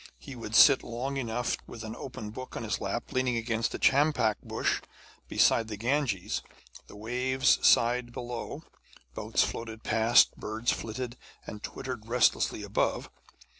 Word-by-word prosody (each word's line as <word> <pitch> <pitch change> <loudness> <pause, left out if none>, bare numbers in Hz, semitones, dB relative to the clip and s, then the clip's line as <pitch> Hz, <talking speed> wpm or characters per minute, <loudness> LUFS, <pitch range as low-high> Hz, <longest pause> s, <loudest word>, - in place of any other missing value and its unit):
He 135 - -10
would 115 -2 -5
sit 140 +2 +8
long 130 +4 -4
enough 120 -2 -1
with 115 - -9
an 110 0 -6
open 110 -5 -7
book 130 +3 -8
on - - -5
his 105 -3 -2
lap, 105 +4 -3
leaning 130 -3 0
against 115 0 -1
a - - -2
champak 135 -6 +3
bush - - -1 0.5
beside 115 -1 +3
the 105 -2 -6
Ganges. 120 -4 -1 0.5
The - - -13
waves 125 +5 +1
sighed 120 +1 +4
below, 120 -1 -6 0.5
boats - - +1
floated 110 -1 -5
past, 110 +1 +4
birds 110 +2 -1
flitted 120 +2 -5 0.3
and 105 - -8
twittered 115 -3 -6
restlessly 120 +1 +2
above. - - -1
120 Hz, 145 wpm, -29 LUFS, 110-130 Hz, 0.5 s, sit